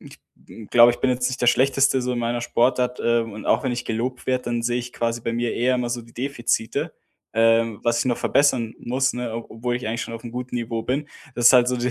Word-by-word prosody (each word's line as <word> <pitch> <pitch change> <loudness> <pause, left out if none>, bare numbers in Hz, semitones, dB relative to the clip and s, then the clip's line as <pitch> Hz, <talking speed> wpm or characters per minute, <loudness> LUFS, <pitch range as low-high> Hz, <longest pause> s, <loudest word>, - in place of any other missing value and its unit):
Ich - - -14 0.5
glaube, 120 0 +7
ich - - -8
bin 135 - +2
jetzt 125 0 0
nicht 130 - -5
der 120 - +1
Schlechteste 135 +1 +3
so 125 0 -1
in 125 - -2
meiner 120 0 -1
Sportart, 125 +1 +1
äh, 120 0 +2
und 110 -2 -7
auch - - +2
wenn 130 -3 -1
ich 120 - -4
gelobt 125 +3 -3
werde, 130 -1 0
dann 120 -1 -2
sehe 120 +1 0
ich 125 0 -6
quasi 115 0 -2
bei 115 - -3
mir 120 0 -1
eher 125 +2 +1
immer 125 -1 -2
so 120 0 -3
die 115 0 -18
Defizite, 120 -3 -2 0.4
ähm, 115 -1 +2
was 120 0 +1
ich - - 0
noch 120 - 0
verbessern 125 -5 +2
muss, 130 +2 0
ne, 125 -2 -4
ob 115 0 -7
obwohl 120 +2 -2
ich 125 - -6
eigentlich 115 +2 -2
schon 115 - -7
aufm 115 +1 -8
guten 125 0 -5
Niveau 115 -1 -3
bin. 140 +5 -2 0.3
Das 120 -1 +2
ist - - +9
halt 125 -1 +5
so 125 - 0
de 125 +1 -1
120 Hz, 255 wpm, -23 LUFS, 115-125 Hz, 0.5 s, ist